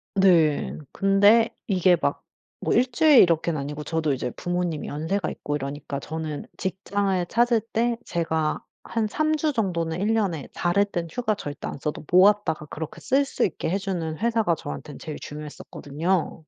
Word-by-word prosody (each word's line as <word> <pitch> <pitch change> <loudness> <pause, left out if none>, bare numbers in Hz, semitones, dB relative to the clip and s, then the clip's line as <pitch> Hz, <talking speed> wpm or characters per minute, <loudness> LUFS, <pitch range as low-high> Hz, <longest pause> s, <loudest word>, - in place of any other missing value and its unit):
네. 160 - +3
근데 205 +4 +5 0.2
이게 185 -3 +4
막 - - 0 0.4
뭐 - - +1
1 250 +1 +3
주일 300 0 +6
이렇게는 165 -2 +2
아니고 145 +2 -5
저도 160 -2 0
이제 125 -2 -3
부모님이 175 -3 -2
연세가 160 +5 -2
있고 145 0 -3
이러니까 140 0 -5
저는 155 0 -5
직장을 190 0 -1
찾을 235 +2 +3
때 230 +1 -1
제가 160 -2 -1 0.2
한 225 -2 -1
3 310 +6 +1
주 310 0 0
정도는 175 - -1
1 210 +3 +1
년에 190 -10 -1
다를 180 +4 +2
땐 175 -4 -4
휴가 220 +1 0
절대 145 -7 -6
안 - - -5
써도 150 +2 -4
모았다가 185 -5 +4
그렇게 155 +1 -7
쓸 275 +2 +2
수 - - -2
있게 170 - -3
해 190 - +1
주는 175 -6 -3
회사가 225 -5 +1
저한텐 145 -1 -7
제일 155 -2 -6
중요했었거든요. 150 +3 -3
175 Hz, 325 characters per minute, -25 LUFS, 155-205 Hz, 0.4 s, 주일